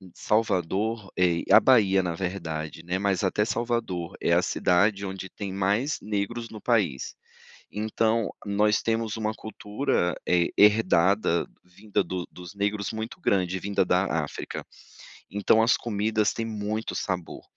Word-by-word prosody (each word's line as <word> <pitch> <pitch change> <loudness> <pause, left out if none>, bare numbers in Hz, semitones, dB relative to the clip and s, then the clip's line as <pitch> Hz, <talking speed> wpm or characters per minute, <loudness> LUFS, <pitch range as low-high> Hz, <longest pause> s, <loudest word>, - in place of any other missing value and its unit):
Salvador, 105 0 0
eh, 85 -2 +2
a - - +10
Bahia 100 -7 +4
na 85 -2 -3
verdade, 80 -4 -4 0.2
mas 100 -2 0
até 105 +3 +1
Salvador, 115 -8 -2
é - - +1
a - - +5
cidade, 100 +3 +2
onde 95 -1 -6
tem 100 -3 -6
mais 100 +9 0
negros 110 +3 -3
no 110 - -9
país. 100 - 0 0.6
Então, 110 +1 0 0.2
nós 105 +1 +2
temos 115 -1 -1
uma 110 0 -1
cultura, 105 - -2
eh, 85 -1 +3
herdada 100 -3 +4 0.2
vinda 100 +4 -2
do 90 0 -4
dos 90 +1 -11
negros 100 0 -1
muito 110 +10 -6
grande, 95 - +1
vinda 100 -1 0
da 90 +2 +2 0.2
África. 70 - -6 0.7
Então, 105 +3 +3
as 115 0 +4
comidas, 110 -1 0
têm 115 - -3
muito 110 0 -3
sabor, 90 -3 -4
100 Hz, 135 wpm, -26 LUFS, 90-110 Hz, 0.7 s, a